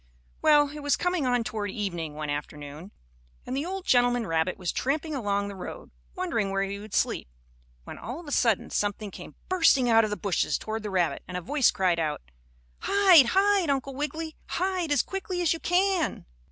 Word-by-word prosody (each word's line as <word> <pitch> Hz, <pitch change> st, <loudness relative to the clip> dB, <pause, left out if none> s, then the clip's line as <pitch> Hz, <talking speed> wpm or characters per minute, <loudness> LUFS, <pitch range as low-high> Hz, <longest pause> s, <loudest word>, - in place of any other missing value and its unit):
Well, 295 Hz, -2 st, +5 dB
it 300 Hz, +1 st, -8 dB
was 290 Hz, 0 st, +2 dB
coming 355 Hz, -6 st, 0 dB
on 245 Hz, -1 st, +2 dB
toward 210 Hz, -2 st, -3 dB
evening, 175 Hz, -7 st, -4 dB
one 150 Hz, -1 st, -4 dB
afternoon, 150 Hz, +4 st, -6 dB, 0.5 s
and -, -, -4 dB
the 285 Hz, +5 st, -2 dB
old 380 Hz, 0 st, -5 dB
gentleman 245 Hz, -1 st, +3 dB
rabbit 165 Hz, 0 st, 0 dB
was 180 Hz, -3 st, -2 dB
tramping 305 Hz, +4 st, -1 dB
along 205 Hz, -6 st, -1 dB
the 200 Hz, -, -7 dB
road, 185 Hz, -, -8 dB, 0.2 s
wondering 305 Hz, -, -1 dB
where 195 Hz, 0 st, 0 dB
he 200 Hz, +1 st, -4 dB
would 210 Hz, 0 st, -7 dB
sleep, -, -, 0 dB, 0.6 s
when -, -, -9 dB
all 245 Hz, +8 st, -6 dB
of 345 Hz, -, -11 dB
a 290 Hz, -, -8 dB
sudden 230 Hz, -7 st, +1 dB
something 205 Hz, 0 st, -2 dB
came -, -, -10 dB
bursting 275 Hz, -9 st, +4 dB
out 225 Hz, 0 st, +6 dB
of 215 Hz, -, 0 dB
the 210 Hz, -, -3 dB
bushes 195 Hz, -4 st, 0 dB
toward 220 Hz, +1 st, -4 dB
the 210 Hz, -, -5 dB
rabbit, 180 Hz, -4 st, 0 dB
and 180 Hz, 0 st, -4 dB
a -, -, -4 dB
voice 275 Hz, -, +3 dB
cried 185 Hz, -4 st, +1 dB
out: 155 Hz, -, -2 dB, 0.6 s
"Hide! 380 Hz, -9 st, +6 dB
Hide! 390 Hz, -3 st, +3 dB
Uncle 275 Hz, 0 st, -1 dB
Wiggily. 310 Hz, +3 st, -4 dB
Hide 365 Hz, -3 st, -1 dB
as 290 Hz, -, +3 dB
quickly 385 Hz, -1 st, -4 dB
as 345 Hz, -3 st, +2 dB
you 330 Hz, -, -5 dB
can!" 365 Hz, -1 st, +1 dB
245 Hz, 195 wpm, -27 LUFS, 195-320 Hz, 0.6 s, out